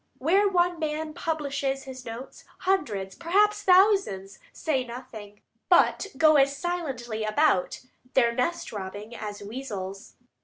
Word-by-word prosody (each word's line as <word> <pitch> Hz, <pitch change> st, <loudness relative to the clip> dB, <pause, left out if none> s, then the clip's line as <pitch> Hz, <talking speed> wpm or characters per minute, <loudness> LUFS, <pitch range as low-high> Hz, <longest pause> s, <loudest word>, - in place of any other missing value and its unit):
Where 385 Hz, +9 st, +3 dB
one 350 Hz, -2 st, +1 dB
man 310 Hz, 0 st, -3 dB
publishes 280 Hz, -4 st, -2 dB
his 260 Hz, -1 st, -9 dB
notes, 235 Hz, +4 st, -8 dB, 0.2 s
hundreds, 220 Hz, -, 0 dB
perhaps 410 Hz, +5 st, +2 dB
thousands, 365 Hz, -, +3 dB
say 275 Hz, -5 st, -1 dB
nothing, 235 Hz, -4 st, -10 dB, 0.3 s
but 365 Hz, +2 st, +4 dB
go 310 Hz, +1 st, +6 dB
as 275 Hz, 0 st, +3 dB
silently 270 Hz, -10 st, -3 dB
about 215 Hz, -2 st, +1 dB, 0.3 s
their 235 Hz, -3 st, +4 dB
nest 255 Hz, +9 st, -1 dB
robbing 205 Hz, +3 st, -7 dB
as 205 Hz, -1 st, -6 dB
weasels. 200 Hz, -4 st, -7 dB
270 Hz, 120 wpm, -26 LUFS, 215-335 Hz, 0.3 s, go